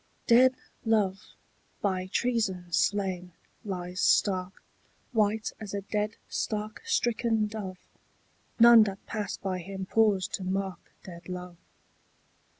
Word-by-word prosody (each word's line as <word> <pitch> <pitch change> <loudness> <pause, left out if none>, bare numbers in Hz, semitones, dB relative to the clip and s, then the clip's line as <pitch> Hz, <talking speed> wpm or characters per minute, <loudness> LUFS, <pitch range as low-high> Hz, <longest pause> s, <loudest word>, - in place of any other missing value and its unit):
DEAD 255 +2 +6 0.3
love, 205 -4 0 0.4
by 185 -2 -1
treason 190 -6 -1
slain, 185 -3 0 0.3
lies 180 -3 -4
stark, 185 -2 +2 0.5
White 215 -1 +1
as 205 -2 -6
a 200 - -2
dead 210 +1 -2
stark 215 0 -3
stricken 235 - +1
dove: 210 -3 -6 0.8
None 235 0 +9
that 195 -1 -6
pass 215 -2 -4
by 185 -2 -3
him 190 +1 -6
pause 205 -2 +3
to 190 - -4
mark 190 0 -3
Dead 170 -1 -11
love. 180 -1 -7
200 Hz, 115 wpm, -28 LUFS, 185-220 Hz, 0.8 s, None